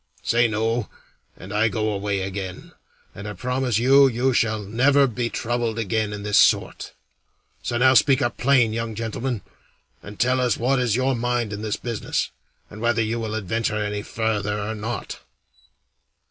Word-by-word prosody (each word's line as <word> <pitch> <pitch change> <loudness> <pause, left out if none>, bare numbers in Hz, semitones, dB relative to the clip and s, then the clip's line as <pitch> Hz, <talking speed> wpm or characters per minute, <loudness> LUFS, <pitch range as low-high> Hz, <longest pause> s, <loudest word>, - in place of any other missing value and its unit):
Say 120 +1 +3
'No,' 110 +1 -1 0.5
and 95 +2 -9
I 105 +2 +3
go 110 -1 -1
away 100 -1 -2
again, 95 -1 -6 0.4
and 100 +1 -8
I 105 - -5
promise 125 +2 -1
you 135 +4 +6
you 130 +1 +1
shall 110 -3 +1
never 135 +7 +3
be 120 -1 -2
troubled 120 -1 -2
again 110 -1 -1
in 105 -1 -6
this 105 0 +3
sort. - - +2 0.7
So 120 - -2
now 130 +2 +5
speak 135 +1 +5
up 120 -3 -1
plain, 125 -4 +3
young 115 -1 -3
gentleman, 115 +1 -3 0.6
and 100 0 -11
tell 130 +1 +2
us 125 -2 +1
what 130 +3 +1
is 120 -4 +1
your 130 +1 +1
mind 120 -2 -1
in 105 - -5
this 110 -1 -2
business, 115 -3 -3 0.4
and 105 - -11
whether 120 -1 +2
you 115 +2 -2
will 110 -1 -3
adventure 110 +1 -1
any 105 -1 -2
farther 105 -2 -2
or 105 +2 -3
not." 110 +2 -5
115 Hz, 170 wpm, -23 LUFS, 105-120 Hz, 0.7 s, you